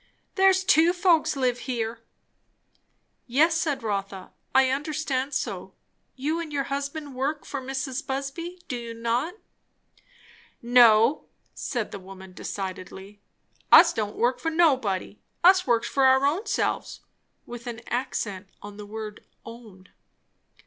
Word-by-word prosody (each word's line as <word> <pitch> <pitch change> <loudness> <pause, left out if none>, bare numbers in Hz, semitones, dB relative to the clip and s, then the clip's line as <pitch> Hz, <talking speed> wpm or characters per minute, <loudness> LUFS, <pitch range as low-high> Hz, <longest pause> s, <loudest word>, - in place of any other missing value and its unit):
"There's 380 -1 +4
two 335 -1 +4
folks 350 -5 +2
lives 250 -3 0
here." 230 -3 -3 1.3
"Yes," 300 +7 +3
said 310 -6 -1
Rotha, 195 -3 -4 0.2
"I 265 -1 +5
understood 285 -1 -2
so. - - -4 0.4
You 300 +5 -2
and 330 -2 -6
your 280 -2 -1
husband 280 +1 -4
work 280 +4 -2
for 280 - -5
Mrs. 270 +1 -4
Busby, 280 +7 -4
do 255 - -3
you 235 -1 -6
not?" 235 - -1 1.2
"No," 235 +1 +5 0.3
said 240 -5 -4
the 200 - -7
woman 190 0 -12
decidedly. 190 +1 -7 0.5
"Us - - +9
don't 210 -2 -3
work 245 +2 +1
for 325 - -1
nobody. 260 - +1 0.2
Us 370 -1 +6
works 235 -1 +2
for 275 - +1
our 265 +1 +5
ownselves;" 330 +10 -1 0.4
with 240 0 -9
an 235 -1 -6
accent 205 -6 -3
on 205 0 -9
the 210 -1 -9
word 215 -1 -7 0.2
"own." 220 -5 -13
255 Hz, 130 wpm, -25 LUFS, 220-295 Hz, 1.3 s, Us